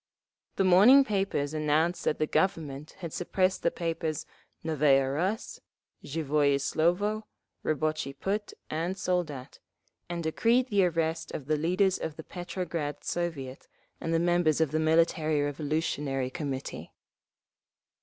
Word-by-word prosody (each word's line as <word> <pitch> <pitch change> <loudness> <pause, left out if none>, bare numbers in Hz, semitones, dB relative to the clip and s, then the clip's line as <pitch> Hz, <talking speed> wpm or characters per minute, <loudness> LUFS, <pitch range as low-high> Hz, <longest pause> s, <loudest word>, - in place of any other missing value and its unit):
The - - +2
morning 205 +10 +7
papers 195 - -1
announced 155 +3 +1
that - - +1
the 155 - +1
Government 150 -5 -1
had 170 -3 -5
suppressed 185 +1 0
the - - +3
papers 165 -2 -3 0.4
Novaya 140 -4 +3
Rus, 190 +9 -2 0.4
Zhivoye 145 -2 +1
Slovo, 190 +9 0 0.4
Rabotchi 155 -3 -1
Put 205 +2 -2 0.2
and 170 +5 -2
Soldat, 160 -8 -2 0.5
and 170 -1 -3
decreed 235 +10 +2
the 200 -4 +4
arrest 165 -1 -1
of 140 - -5
the 155 +2 +1
leaders 180 +5 +2
of 155 - -4
the 160 - -8
Petrograd 170 -4 -4
Soviet 150 -7 -4 0.3
and 165 - -3
the 165 - +3
members 175 -2 +2
of 160 -4 +2
the 155 - +1
Military 160 -1 +2
Revolutionary 145 -2 -1
Committee…. 140 -5 -5
160 Hz, 125 wpm, -29 LUFS, 150-180 Hz, 0.5 s, morning